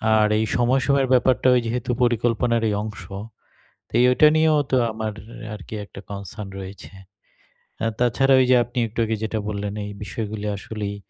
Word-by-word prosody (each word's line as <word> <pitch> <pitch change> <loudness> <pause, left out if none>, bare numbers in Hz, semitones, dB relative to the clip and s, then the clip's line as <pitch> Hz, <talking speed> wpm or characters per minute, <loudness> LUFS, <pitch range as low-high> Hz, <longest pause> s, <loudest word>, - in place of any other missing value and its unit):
আর 105 -1 +4
এই 110 - +1
সময় 125 +2 +2
সময়ের 140 -1 +2
ব্যাপারটা 130 0 +3
ওই - - +4
যেহেতু 120 +1 -3
পরিকল্পনার 120 0 +1
এই 105 - 0
অংশ। 105 -2 -7 0.9
তো - - -26 0.2
ওটা 150 +4 +6
নিয়েও 155 -1 +4
তো - - +4 0.2
আমার 110 0 -3 0.4
আর 105 - -7
কি - - -6
একটা 100 - -12
কনসার্ন 100 +1 -7
রয়েছে। 95 +1 -9 0.9
আ - - +2
তাছাড়া 135 +3 +3
ওই 130 - +4
যে, 130 - +6
আপনি 120 +1 -13
একটু 110 - -7
আগে 110 0 -1
যেটা 110 0 -2
বললেন 100 -1 -3
এই 105 - -6
বিষয়গুলো 105 0 -5
আসলেই 105 0 -5
110 Hz, 175 wpm, -23 LUFS, 105-125 Hz, 0.9 s, ওটা